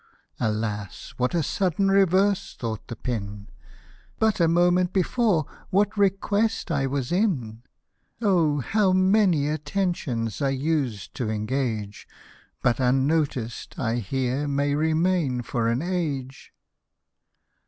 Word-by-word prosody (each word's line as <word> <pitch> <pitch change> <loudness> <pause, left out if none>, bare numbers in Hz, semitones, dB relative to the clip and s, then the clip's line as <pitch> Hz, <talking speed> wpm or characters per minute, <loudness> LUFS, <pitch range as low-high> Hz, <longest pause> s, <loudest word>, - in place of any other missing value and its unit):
' - - -39
< - - -34
Alas! 105 -2 -4
what 125 +6 0
a 165 - +2
sudden 195 +4 +1
reverse! 195 +1 +2
" - - -31
thought 110 -3 -4
the 120 - -6
pin, 105 -3 -5 0.4
" - - -29
But 220 -2 +1
a 170 - +4
moment 175 +2 +3
before 195 - +2 0.2
what 205 +2 +2
request 205 +1 +1
I 140 -3 +1
was 135 0 -2
in;! 140 - 0 0.6
how 185 - +2
many 185 -5 +3
attentions 150 - -2
I 140 - +2
used 135 -7 -2
to 120 -4 -2
engage, 110 -2 -3 0.6
But 120 0 +2
unnoticed 130 -2 0
I 115 -2 -1
here 130 +5 -1
may 140 0 0
remain 155 -3 +1
for 115 -1 -1
an 120 +5 0
age." 145 -8 -3
145 Hz, 125 wpm, -25 LUFS, 120-185 Hz, 0.6 s, a